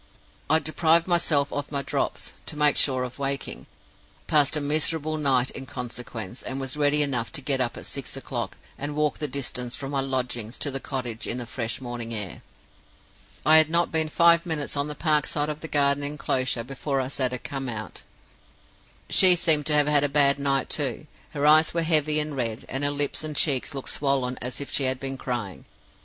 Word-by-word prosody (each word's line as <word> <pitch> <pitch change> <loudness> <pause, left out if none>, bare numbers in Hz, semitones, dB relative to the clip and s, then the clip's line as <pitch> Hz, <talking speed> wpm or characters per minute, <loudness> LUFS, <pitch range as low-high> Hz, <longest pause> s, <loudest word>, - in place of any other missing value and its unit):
I 160 - +6
deprived 160 +2 +2
myself 160 -5 +1
of 145 0 -4
my 140 -1 -1
Drops, - - -3
to - - -5
make 150 -1 +4
sure 130 -2 +2
of 125 +2 -7
waking; 140 0 -3 0.6
passed 150 0 +3
a - - 0
miserable 155 +1 +2
night 130 -3 +2
in 135 - -7
consequence; 120 -3 -7
and 130 +1 -4
was 135 0 -2
ready 150 0 +3
enough 125 -5 -2
to 160 - +1
get 135 -1 0
up 120 -2 -2
at - - -9
six - - -4
o'clock, - - -5 0.2
and 145 +1 -4
walk 150 -1 0
the 150 - -1
distance 125 -2 -2
from 135 0 -6
my 140 - 0
lodgings 125 -3 -2
to 145 - -2
the 135 - -1
cottage 125 -5 -4
in 120 - -3
the 125 - -5
fresh 115 0 -4
morning 120 -2 -6
air. 100 -4 -5 1.0
"I 155 +1 +8
had 155 -1 +6
not 170 +1 +2
been 160 -1 0
five 170 +1 +4
minutes 160 -5 -2
on 140 +1 -1
the 150 - -5
park 150 -2 +1
side 150 0 -1
of 150 0 -4
the 160 - -7
garden 140 -1 +2
inclosure 130 -4 -1
before 135 +2 -3
I 130 - -2
saw 130 -1 0
her 125 - -4
come 135 0 -5
out. 110 -2 -7 1.1
"She 185 -2 +7
seemed 160 -4 +3
to 155 - +3
have 150 -1 +4
had 145 -1 +3
a 145 - +1
bad 140 -1 +4
night 135 -1 +1
too; 140 -2 -1 0.3
her 145 0 -1
eyes 155 +2 +5
were 170 - +1
heavy 155 -2 +2
and 150 -1 -2
red, 115 -3 -3
and 135 +1 -3
her 145 - +3
lips 145 +1 0
and 155 -1 -4
cheeks 140 -2 +1
looked 135 - -4
swollen 135 -3 -1
as 125 +1 -4
if 140 - -5
she 140 - +2
had 130 0 +1
been 135 0 -5
crying. 115 -7 -5
140 Hz, 205 wpm, -25 LUFS, 130-150 Hz, 1.1 s, I